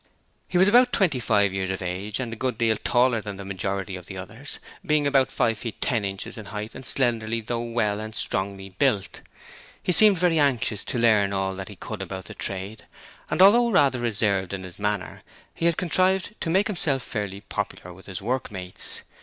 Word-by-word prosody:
He 180 - 0
was 190 +2 +6
about 245 +4 +6
twenty 175 - +2
five 100 -4 +2
years 95 -1 -2
of 95 - -2
age 95 +5 -3
and 120 -3 -3
a - - -5
good 125 0 -2
deal 115 -1 +2
taller 120 +1 +2
than 105 -2 -7
the 100 - -8
majority 95 0 -3
of 90 -1 -10
the 95 - -7
others, 110 +9 -8 0.3
being 150 -1 +2
about 135 -2 +3
five 115 -2 0
feet 115 -3 -6
ten 115 -4 0
inches 95 +2 -5
in 110 - -9
height 105 +1 -6
and 130 - -9
slenderly 115 -3 0
though 115 +1 -3
well 115 -3 -1
and 110 0 -7
strongly 95 0 -2
built. 95 +1 0 0.6
He - - +1
seemed 205 +1 +7
very 165 -2 +2
anxious 120 -7 +1
to - - -3
learn 105 -4 +3
all 95 0 -1
that 95 0 -7
he - - -9
could - - -7
about 95 -2 -6
the - - -8
trade, 100 +3 -5 0.4
and 185 - +4
although 235 +5 +6
rather 140 - +3
reserved 100 -5 0
in 95 -1 -4
his 90 0 -11
manner, 105 -2 -2 0.3
he 170 - 0
had 170 - +1
contrived 185 +3 +2
to 165 - -2
make 190 +5 +3
himself 150 - -1
fairly 100 -3 -4
popular 90 -3 -5
with 95 +2 -15
his 95 -1 -6
workmates. 105 -7 -1
110 Hz, 205 wpm, -25 LUFS, 100-135 Hz, 0.6 s, seemed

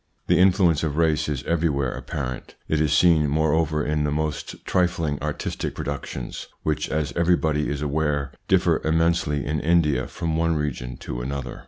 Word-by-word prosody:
The 90 0 +3
influence 90 -4 +4
of 75 -2 -2
race 80 -2 +2
is 70 -3 -2
everywhere 75 -6 0
apparent. 65 -4 -5
It 80 -1 +1
is 75 -2 +1
seen, 80 -1 +5
moreover, 80 0 +1
in 75 0 0
the 75 - +1
most 75 +1 -3
trifling 85 -5 0
artistic - - -3
productions, 70 -3 -5 0.2
which, 75 -1 -1
as 75 -1 -1
everybody 80 -3 +2
is 75 0 -3
aware, 75 -2 0 0.2
differ - - +3
immensely 80 -3 +1
in 75 +1 -1
India 75 -5 +2
from 85 -2 -3
one 85 0 +1
region 65 -5 -3
to - - -4
another. 65 -1 -5
75 Hz, 160 wpm, -24 LUFS, 70-80 Hz, 0.2 s, seen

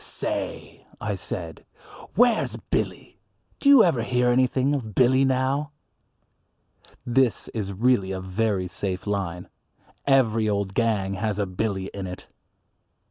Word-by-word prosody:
"Say!" - - -5
I - - -2
said, - - -5 0.5
"where's 240 -3 +3 0.2
Billy? - - -2 0.4
Do 280 - +3
you 275 -5 +9
ever 150 -10 +2
hear 125 +1 +1
anything 130 +2 +2
of 115 -7 -4
Billy 130 +1 +4
now?" 135 +3 0 1.3
This 125 -1 +1
is 105 -3 -4
really 100 -1 +1
a 95 - -3
very 95 0 -1
safe 95 0 -4
line. 95 -4 -3 0.6
Every 115 -5 +3
old 100 -2 -1
gang 105 -4 0
has 105 +1 -2
a 100 - 0
Billy 95 0 -3
in 100 -2 -5
it. 90 - -8
110 Hz, 130 wpm, -25 LUFS, 95-130 Hz, 1.3 s, you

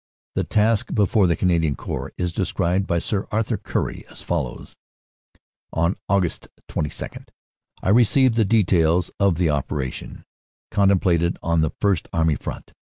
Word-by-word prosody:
The - - 0
task 110 0 +1
before 105 -1 +3
the 85 - +2
Canadian 80 -5 +1
Corps - - -5
is 90 -1 -2
described 95 +1 0
by 85 - +1
Sir 100 +4 -2
Arthur 110 0 0
Currie - - -3
as - - -11
follows: - - -4 1.0
"On 85 +3 +1
Aug. 95 -4 0 0.2
22 75 - -4 0.6
I - - +1
received 120 +4 +4
the 115 0 +3
details 90 -5 +2
of 100 -3 +3
the 85 -2 +1
operation 70 -2 -4 0.5
contemplated 90 -4 +2
on 85 -1 +2
the 80 - +1
First 100 -5 +1
Army 80 -1 +2
Front. - - -7
90 Hz, 140 wpm, -22 LUFS, 85-100 Hz, 1.0 s, received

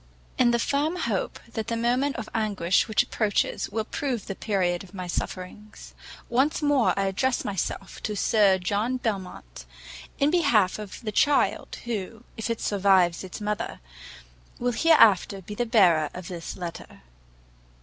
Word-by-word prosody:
IN 245 - +5
the 235 - +3
firm 285 +7 0
hope 235 - -2
that 220 -1 -3
the 230 - -1
moment 250 +4 +1
of 220 -2 -5
anguish 200 -5 +1
which 220 - +3
approaches 210 -3 -1
will 220 +2 -2
prove 250 -6 -3
the - - -4
period 185 -4 -1
of 190 +1 -14
my 185 -1 -5
sufferings, 185 +4 -6 0.3
once 265 +5 +1
more 285 -8 +3
I 195 - +1
address 245 +7 0
myself 195 -4 -4
to 210 - -3
Sir 200 -2 +3
John 205 +7 -1
Belmont, 185 - -5 0.5
in 280 +2 +2
behalf 240 - +3
of 210 -2 -8
the 215 - -4
child, 285 +7 +1
who, 225 0 -5
if 220 0 -4
it 230 - -2
survives 190 -4 +3
its 185 - -8
mother, 210 0 -3 0.8
will 245 0 0
hereafter 220 - +4
be 210 - -8
the 240 +3 -2
bearer 175 -9 +4
of 180 -2 -7
this 170 -2 -6
letter. 175 - -8
210 Hz, 155 wpm, -26 LUFS, 190-240 Hz, 0.8 s, IN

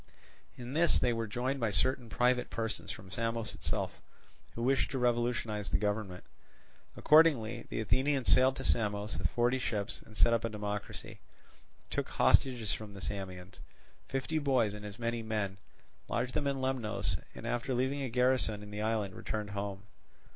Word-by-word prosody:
In 125 +1 -6
this 165 0 +4
they 120 - +2
were 115 -1 -2
joined 125 +6 -1
by 115 -3 +1
certain 125 +4 +2
private 125 +2 +2
persons 110 -1 -3
from 95 -1 -8
Samos 115 0 -2
itself, - - -3 0.5
who 115 - -3
wished 135 +2 +2
to 135 - -3
revolutionize 120 -4 0
the - - +2
government. 105 -3 -2 0.7
Accordingly 135 -8 +4
the - - -2
Athenians 130 +5 +1
sailed 130 +1 +5
to 135 - -5
Samos 105 -6 0
with 85 -2 0
forty 120 +2 +2
ships 110 -3 -2
and 110 -1 -14
set 115 - +5
up 115 - +1
a 115 - 0
democracy; 105 -1 -5 0.7
took - - -1
hostages 120 -5 +3
from 105 -2 -7
the - - -8
Samians, 95 -2 -6 0.5
fifty 135 +4 -1
boys 130 -8 +2
and 105 0 -8
as 105 +1 -9
many 115 0 -1
men, 105 -3 -2 0.5
lodged 125 +1 -1
them 145 -2 0
in 135 -1 -1
Lemnos, 115 -7 -1 0.2
and - - -8
after 120 +2 -1
leaving 130 +3 0
a 135 - -2
garrison 125 -3 +2
in 105 - -10
the 105 0 -4
island 110 -3 0
returned 105 +1 -4
home. 100 -1 -4
115 Hz, 170 wpm, -32 LUFS, 105-130 Hz, 0.7 s, sailed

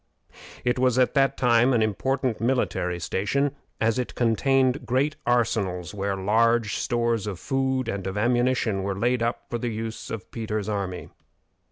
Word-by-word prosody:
It 125 +1 +1
was 130 -1 +3
at 130 -1 +3
that 135 -1 +2
time 120 0 +4
an 115 -2 +3
important 125 +2 -1
military 115 -8 0
station, 140 - -1 0.2
as 115 +2 +1
it 125 - -4
contained 130 +3 +2
great 135 +5 0
arsenals 105 -7 0
where 100 -1 -2
large 110 +3 +2
stores 115 -3 0
of 95 -4 -4
food 130 -2 -1
and 100 -4 -3
of 95 +2 -4
ammunition 120 -2 +1
were 95 0 -2
laid 120 +3 +1
up 115 +1 -1
for 120 - -1
the 120 - -2
use 110 0 -5
of 105 -5 -6
Peter's 110 -3 -3
army. 100 -4 -3
115 Hz, 160 wpm, -25 LUFS, 105-125 Hz, 0.2 s, time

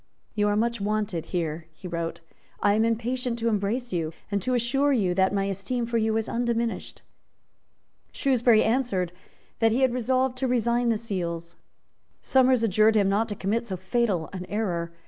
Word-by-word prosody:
"You 210 -1 +1
are 205 - +2
much 235 0 0
wanted 205 -4 -1
here," 165 -2 -3
he 180 +4 -10
wrote: 170 -1 -4 0.4
"I 205 - +3
am 220 +1 +3
impatient 235 +2 -1
to 230 0 -1
embrace 215 +3 -1
you, 165 -2 -2 0.2
and 200 -1 0
to 255 +6 0
assure 270 +4 +2
you 200 -9 +2
that 190 +1 +2
my 200 -1 0
esteem 200 +5 -2
for 230 0 0
you 220 0 +1
is 225 - -1
undiminished." 235 -1 -2 1.1
Shrewsbury 245 -5 +3
answered 220 -7 0 0.5
that 225 -1 +4
he 245 +4 +1
had 260 -2 +3
resolved 255 +1 0
to 265 - 0
resign 240 0 +1
the 225 - +2
seals. 170 -6 -4 0.6
Somers 260 -2 +3
adjured 215 +1 +4
him 200 -2 +3
not 215 +3 +1
to 205 - -3
commit 225 +5 -1
so 190 - -4
fatal 190 -3 0
an 185 -1 -6
error. 175 -6 -2
220 Hz, 175 wpm, -26 LUFS, 190-240 Hz, 1.1 s, that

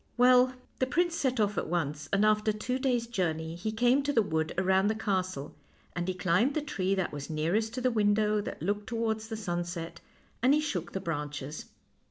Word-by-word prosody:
Well, 250 +1 +6 0.3
the 260 - +2
prince 345 +4 +1
set 260 -6 0
off 210 -1 +1
at - - -4
once, 150 -3 -2
and 195 +2 +3
after 215 0 +3
two 250 +5 -2
days' 250 -3 +1
journey 165 -8 -2
he 180 +6 -3
came 245 +5 +3
to 285 +1 -1
the 230 -6 +3
wood 160 -3 -1
around 190 +1 +3
the 220 - +1
castle, 185 -8 -2 0.4
and 175 0 -2
he 185 - -1
climbed 185 +9 +2
the 310 - +1
tree 195 -8 -1
that 190 -5 -2
was 145 +1 -6
nearest 185 +9 0
to 255 - -3
the 255 0 +2
window 210 -1 +2
that 180 - -6
looked 205 +3 -1
towards 225 -2 -1
the 220 -1 -5
sunset, 175 -4 -4 0.4
and 260 +4 +5
he - - +3
shook 185 - -3
the 190 - -2
branches. 150 -3 -4
205 Hz, 205 wpm, -30 LUFS, 175-240 Hz, 0.4 s, Well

